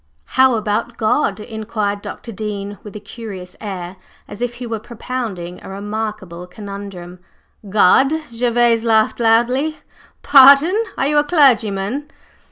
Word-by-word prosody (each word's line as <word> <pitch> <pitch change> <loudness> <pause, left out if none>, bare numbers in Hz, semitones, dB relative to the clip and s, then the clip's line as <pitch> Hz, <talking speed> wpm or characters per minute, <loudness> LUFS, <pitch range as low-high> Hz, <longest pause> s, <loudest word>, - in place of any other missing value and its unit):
"How 260 -1 +5
about 225 +2 -2
God?" 215 -2 +1
inquired 215 -2 -4
Dr. 230 - -8
Dean 205 -1 -5
with 210 -1 -11
a - - -5
curious 200 -4 -9
air, 185 -3 -6 0.3
as 205 - -10
if 245 0 -2
he 245 0 -7
were 225 -2 -4
propounding 220 -6 -6
a - - -9
remarkable 200 -3 -5
conundrum. 195 -2 -9 0.5
"God!" 210 +7 +4 0.3
Gervase 235 -1 +2
laughed 220 -1 +2
loudly. 240 +7 +2 0.5
"Pardon! 280 +6 +7 0.2
Are - - 0
you 295 +1 +3
a - - +3
clergyman?" 260 - +2
220 Hz, 130 wpm, -18 LUFS, 200-245 Hz, 0.5 s, Pardon